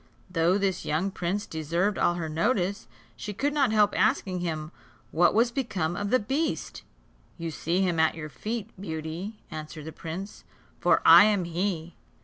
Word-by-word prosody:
Though 175 Hz, +2 st, +3 dB
this 195 Hz, -2 st, -1 dB
young 170 Hz, +6 st, -1 dB
prince 190 Hz, +3 st, -2 dB
deserved 170 Hz, +6 st, -1 dB
all 175 Hz, -, +3 dB
her 170 Hz, -2 st, -3 dB
notice, 190 Hz, +4 st, 0 dB, 0.3 s
she 210 Hz, -, -6 dB
could 285 Hz, +7 st, 0 dB
not 275 Hz, -6 st, +2 dB
help 210 Hz, -1 st, +4 dB
asking 185 Hz, -2 st, +1 dB
him 160 Hz, -3 st, -3 dB, 0.4 s
what 175 Hz, +4 st, +3 dB
was 235 Hz, +2 st, +4 dB
become 195 Hz, -, -2 dB
of 205 Hz, +1 st, -2 dB
the 255 Hz, -, +5 dB
beast. 270 Hz, +9 st, -2 dB, 0.6 s
"You 165 Hz, -2 st, -4 dB
see 170 Hz, +4 st, -1 dB
him 180 Hz, -4 st, +1 dB
at 160 Hz, 0 st, +3 dB
your 155 Hz, -2 st, -6 dB
feet, 220 Hz, +6 st, -5 dB
Beauty," 165 Hz, +4 st, -5 dB
answered 155 Hz, 0 st, -7 dB
the 160 Hz, -, -6 dB
prince, 170 Hz, +6 st, -7 dB, 0.4 s
"for -, -, +3 dB
I 205 Hz, -, +10 dB
am 205 Hz, -3 st, +2 dB
he. 175 Hz, -1 st, -2 dB
180 Hz, 165 wpm, -27 LUFS, 160-210 Hz, 0.6 s, I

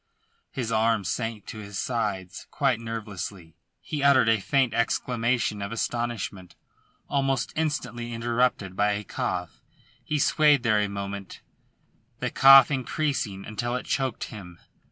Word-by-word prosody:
His 120 Hz, -4 st, -4 dB
arms 110 Hz, -4 st, +1 dB
sank 115 Hz, +1 st, -3 dB
to 110 Hz, -, -8 dB
his 100 Hz, -1 st, -7 dB
sides 100 Hz, -6 st, -3 dB
quite 135 Hz, -5 st, +1 dB
nervelessly. 105 Hz, -6 st, -6 dB, 0.3 s
He 150 Hz, -2 st, -5 dB
uttered 130 Hz, -4 st, +5 dB
a 110 Hz, -1 st, +3 dB
faint 130 Hz, +3 st, +1 dB
exclamation 115 Hz, -2 st, 0 dB
of 100 Hz, +2 st, -4 dB
astonishment, 115 Hz, -6 st, -3 dB, 0.5 s
almost 135 Hz, -3 st, 0 dB
instantly 125 Hz, -7 st, -2 dB
interrupted 115 Hz, -4 st, 0 dB
by 105 Hz, +1 st, +2 dB
a 105 Hz, +1 st, -3 dB
cough. 90 Hz, -3 st, -4 dB, 0.4 s
He 150 Hz, -, -1 dB
swayed 150 Hz, -2 st, +4 dB
there 110 Hz, -3 st, +3 dB
a 105 Hz, -1 st, 0 dB
moment, 100 Hz, -1 st, -6 dB, 0.8 s
the -, -, -3 dB
cough 135 Hz, +2 st, +8 dB
increasing 130 Hz, -7 st, -2 dB
until 120 Hz, +3 st, -3 dB
it 125 Hz, -, -4 dB
choked 130 Hz, -4 st, -1 dB
him. 90 Hz, -5 st, -9 dB
115 Hz, 135 wpm, -26 LUFS, 100-130 Hz, 0.8 s, cough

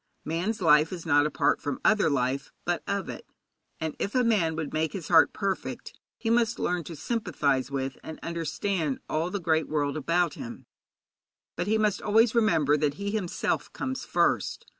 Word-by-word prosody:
Man's 180 Hz, +6 st, -2 dB
life 155 Hz, -1 st, +5 dB
is 175 Hz, -3 st, -6 dB
not 145 Hz, -2 st, +4 dB
apart -, -, +1 dB
from 145 Hz, -2 st, -3 dB
other 210 Hz, -5 st, +4 dB
life, 130 Hz, -1 st, -1 dB
but -, -, 0 dB
of -, -, -1 dB
it, -, -, -7 dB, 0.6 s
and 160 Hz, -1 st, -3 dB
if 200 Hz, -, -3 dB
a 250 Hz, -, +4 dB
man 195 Hz, -9 st, +2 dB
would 155 Hz, -2 st, -4 dB
make 155 Hz, 0 st, 0 dB
his 180 Hz, -6 st, -6 dB
heart 165 Hz, -2 st, +6 dB
perfect, 195 Hz, -2 st, -3 dB, 0.2 s
he 225 Hz, -, -1 dB
must 230 Hz, 0 st, +2 dB
learn 180 Hz, -1 st, -1 dB
to 165 Hz, -, -7 dB
sympathize 145 Hz, -, -1 dB
with 135 Hz, -1 st, -3 dB
and 160 Hz, -, -8 dB
understand 165 Hz, -2 st, -2 dB
all 160 Hz, +3 st, -1 dB
the 200 Hz, -, -3 dB
great 160 Hz, -2 st, +1 dB
world 145 Hz, -2 st, 0 dB
about 165 Hz, +2 st, +1 dB
him. 240 Hz, -2 st, -8 dB, 0.9 s
But -, -, -2 dB
he 220 Hz, +1 st, +3 dB
must 210 Hz, -2 st, +1 dB
always 220 Hz, +2 st, +4 dB
remember 165 Hz, -, +3 dB
that 145 Hz, -1 st, 0 dB
he 200 Hz, +4 st, -3 dB
himself 205 Hz, -5 st, -2 dB
comes 260 Hz, 0 st, -4 dB
first. -, -, 0 dB
165 Hz, 180 wpm, -27 LUFS, 150-205 Hz, 0.9 s, heart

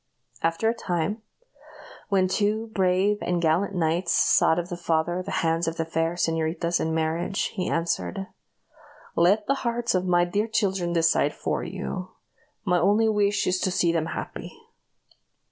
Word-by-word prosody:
After 165 Hz, +6 st, 0 dB
a 225 Hz, -, +3 dB
time, 185 Hz, -1 st, -2 dB, 0.9 s
when 190 Hz, -2 st, +3 dB
two 215 Hz, +3 st, 0 dB
brave 190 Hz, +2 st, +2 dB
and 175 Hz, -1 st, 0 dB
gallant 170 Hz, +4 st, +1 dB
knights 170 Hz, +1 st, +1 dB
sought 160 Hz, -, +4 dB
of 175 Hz, 0 st, -3 dB
the 175 Hz, -, -3 dB
father 175 Hz, +1 st, 0 dB
the -, -, -7 dB, 0.2 s
hands 165 Hz, +1 st, +1 dB
of 165 Hz, -, -2 dB
the 165 Hz, -, -1 dB
fair 165 Hz, +1 st, -1 dB
señoritas 165 Hz, 0 st, 0 dB
in 160 Hz, -, -1 dB
marriage, 165 Hz, +4 st, -1 dB
he 185 Hz, -3 st, -2 dB
answered, 95 Hz, -, -1 dB, 0.9 s
"Let 195 Hz, +5 st, +3 dB
the 275 Hz, -, +2 dB
hearts 235 Hz, 0 st, -1 dB
of 185 Hz, 0 st, 0 dB
my 175 Hz, -1 st, +3 dB
dear 205 Hz, +5 st, -1 dB
children 195 Hz, -6 st, 0 dB
decide 165 Hz, -3 st, +2 dB
for -, -, -2 dB
you. 185 Hz, 0 st, -5 dB, 0.6 s
My 180 Hz, -2 st, +2 dB
only 205 Hz, +5 st, +3 dB
wish 205 Hz, -1 st, +1 dB
is 185 Hz, 0 st, +1 dB
to 185 Hz, -, 0 dB
see 175 Hz, -2 st, +2 dB
them 165 Hz, -1 st, -1 dB
happy." -, -, -6 dB
175 Hz, 160 wpm, -25 LUFS, 165-200 Hz, 0.9 s, sought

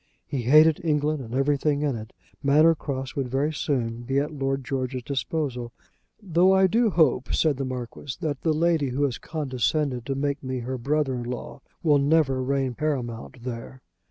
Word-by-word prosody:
He 135 Hz, -, -3 dB
hated 155 Hz, +6 st, +5 dB
England 150 Hz, -2 st, +1 dB
and 115 Hz, +1 st, -6 dB
everything 145 Hz, +1 st, +1 dB
in 140 Hz, -4 st, 0 dB
it. 110 Hz, -1 st, -8 dB, 0.3 s
Manor 150 Hz, +4 st, +5 dB
Cross 135 Hz, -4 st, -5 dB
would 135 Hz, -3 st, -2 dB
very 140 Hz, +5 st, 0 dB
soon 120 Hz, -6 st, -1 dB
be 135 Hz, +3 st, -2 dB
at 145 Hz, +2 st, 0 dB
Lord 135 Hz, -1 st, -2 dB
George's 130 Hz, -1 st, -3 dB
disposal, 130 Hz, -3 st, -3 dB, 0.5 s
"though 185 Hz, -2 st, +3 dB
I 190 Hz, 0 st, +5 dB
do 225 Hz, +5 st, +3 dB
hope," 145 Hz, -8 st, +2 dB
said 155 Hz, -4 st, +2 dB
the 135 Hz, -, -2 dB
Marquis, 130 Hz, +1 st, -6 dB
"that 145 Hz, -4 st, -3 dB
the 160 Hz, -, +1 dB
lady 160 Hz, -2 st, +2 dB
who 135 Hz, +3 st, -1 dB
has 135 Hz, -4 st, -1 dB
condescended 135 Hz, -3 st, -1 dB
to 135 Hz, -, -1 dB
make 140 Hz, +1 st, -1 dB
me 130 Hz, -1 st, -3 dB
her 130 Hz, +2 st, -4 dB
brother 140 Hz, +2 st, 0 dB
in 125 Hz, -, -3 dB
law, 125 Hz, +3 st, -6 dB, 0.2 s
will 150 Hz, -3 st, +4 dB
never 140 Hz, -2 st, +2 dB
reign 135 Hz, -1 st, 0 dB
paramount 125 Hz, -4 st, -3 dB
there." 125 Hz, +1 st, -7 dB
140 Hz, 180 wpm, -25 LUFS, 130-150 Hz, 0.5 s, hated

